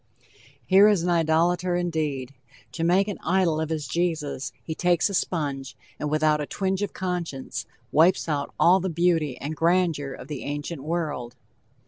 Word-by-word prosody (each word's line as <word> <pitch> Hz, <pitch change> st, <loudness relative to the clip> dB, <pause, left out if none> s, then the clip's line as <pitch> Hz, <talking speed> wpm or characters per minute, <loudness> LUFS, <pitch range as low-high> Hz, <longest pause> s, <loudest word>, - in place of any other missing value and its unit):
Here 195 Hz, -, +7 dB
is 205 Hz, -5 st, +3 dB
an 180 Hz, -, 0 dB
idolator, 170 Hz, +2 st, +2 dB
indeed. 155 Hz, -7 st, -2 dB, 0.4 s
To 145 Hz, +6 st, -4 dB
make 185 Hz, +4 st, +3 dB
an 205 Hz, -, -4 dB
idol 175 Hz, -3 st, +2 dB
of 160 Hz, -, -2 dB
his 155 Hz, -2 st, -2 dB
Jesus 160 Hz, -6 st, -2 dB
he 160 Hz, -, -4 dB
takes 175 Hz, +3 st, +2 dB
a -, -, -5 dB
sponge, 140 Hz, -7 st, -2 dB, 0.2 s
and 150 Hz, -, -2 dB
without 155 Hz, 0 st, +2 dB
a 145 Hz, -, -4 dB
twinge 190 Hz, 0 st, -1 dB
of 205 Hz, -, -1 dB
conscience, 160 Hz, -, -4 dB, 0.2 s
wipes 170 Hz, +5 st, +4 dB
out 145 Hz, -3 st, -2 dB
all 185 Hz, +3 st, +6 dB
the 190 Hz, +1 st, -2 dB
beauty 165 Hz, -5 st, +1 dB
and 150 Hz, +4 st, -5 dB
grandeur 165 Hz, -4 st, +1 dB
of 135 Hz, -, -9 dB
the 145 Hz, -3 st, -5 dB
ancient 145 Hz, +1 st, -4 dB
world. 150 Hz, -6 st, -3 dB
165 Hz, 165 wpm, -25 LUFS, 145-180 Hz, 0.4 s, Here